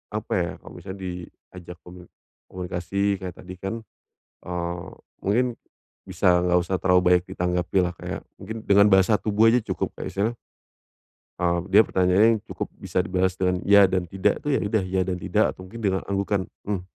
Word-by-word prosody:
apa -, -, -5 dB
ya, -, -, -1 dB
kalau -, -, -12 dB
misalnya 95 Hz, +2 st, -8 dB
diajak 90 Hz, 0 st, -9 dB
komuni 90 Hz, 0 st, -13 dB, 0.5 s
komunikasi 95 Hz, +2 st, -1 dB
kayak 90 Hz, -1 st, -6 dB
tadi 90 Hz, 0 st, -10 dB
kan, 100 Hz, +5 st, -5 dB, 0.6 s
eee, 85 Hz, +1 st, -4 dB, 0.3 s
mungkin 120 Hz, +5 st, +1 dB, 0.6 s
bisa 90 Hz, -1 st, +3 dB
enggak 90 Hz, 0 st, +3 dB
usah 95 Hz, +2 st, -2 dB
terlalu 90 Hz, -1 st, +4 dB
banyak 90 Hz, 0 st, +3 dB
ditanggapilah, 90 Hz, 0 st, 0 dB
kayak -, -, -5 dB, 0.2 s
mungkin 110 Hz, +3 st, -6 dB
dengan 100 Hz, +1 st, +6 dB
bahasa 95 Hz, +2 st, +5 dB
tubuh 105 Hz, +1 st, +2 dB
aja 125 Hz, 0 st, +3 dB
cukup, -, -, -3 dB
kayak -, -, -5 dB
misalnya 105 Hz, +4 st, -1 dB, 1.1 s
eee, 85 Hz, -1 st, +1 dB
dia 105 Hz, -, +8 dB
pertanyaannya 95 Hz, +3 st, +4 dB
yang 105 Hz, -, -6 dB
cukup -, -, -4 dB
bisa -, -, -3 dB
dibalas 95 Hz, +1 st, 0 dB
dengan 90 Hz, -1 st, 0 dB
"ya 100 Hz, -1 st, +7 dB
dan 95 Hz, -1 st, 0 dB
tidak," 95 Hz, +1 st, 0 dB
itu -, -, -6 dB
ya -, -, -1 dB
udah, 100 Hz, -1 st, +1 dB
"ya 95 Hz, 0 st, -1 dB
dan 90 Hz, -1 st, -1 dB
tidak," -, -, +1 dB
atau -, -, -29 dB
mungkin 115 Hz, +5 st, -10 dB
dengan 95 Hz, -1 st, +1 dB
anggukan, 100 Hz, 0 st, 0 dB, 0.3 s
"mmm." 100 Hz, -4 st, -1 dB
95 Hz, 175 wpm, -24 LUFS, 90-100 Hz, 1.1 s, dia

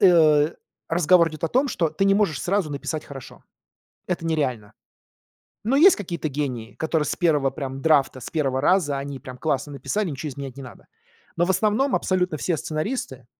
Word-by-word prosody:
э, 155 Hz, -5 st, +5 dB, 0.3 s
разговор 170 Hz, 0 st, +4 dB
идёт 155 Hz, 0 st, -6 dB
о 165 Hz, -, 0 dB
том, 265 Hz, +3 st, +2 dB
что 175 Hz, -9 st, 0 dB
ты 155 Hz, +6 st, -1 dB
не 195 Hz, 0 st, +4 dB
можешь 200 Hz, -9 st, +1 dB
сразу 185 Hz, -4 st, 0 dB
написать 150 Hz, +2 st, -4 dB
хорошо. 135 Hz, -3 st, -11 dB, 0.7 s
Это 175 Hz, -2 st, -2 dB
нереально. 130 Hz, -10 st, -1 dB, 0.9 s
Но 255 Hz, +5 st, +2 dB
есть 360 Hz, +7 st, +7 dB
какие-то 170 Hz, -6 st, -4 dB
гении, 130 Hz, -5 st, -4 dB
которые 160 Hz, -1 st, 0 dB
с -, -, -2 dB
1 150 Hz, -6 st, +2 dB
прям 135 Hz, -2 st, -5 dB
драфта, 140 Hz, -5 st, +3 dB
с -, -, -8 dB
1 135 Hz, -5 st, 0 dB
раза 145 Hz, -3 st, +2 dB
они 140 Hz, 0 st, -6 dB
прям 130 Hz, 0 st, -10 dB
классно 145 Hz, -1 st, -1 dB
написали, 200 Hz, +9 st, -2 dB
ничего 150 Hz, +2 st, -5 dB
изменять 135 Hz, -1 st, -8 dB
не 135 Hz, -, -8 dB
надо. 125 Hz, -, -12 dB, 0.5 s
Но 170 Hz, -, +3 dB
в 180 Hz, -, -1 dB
основном 215 Hz, +8 st, +2 dB
абсолютно 180 Hz, -4 st, 0 dB
все 170 Hz, +3 st, 0 dB
сценаристы, 155 Hz, -, -4 dB
155 Hz, 180 wpm, -23 LUFS, 140-180 Hz, 0.9 s, есть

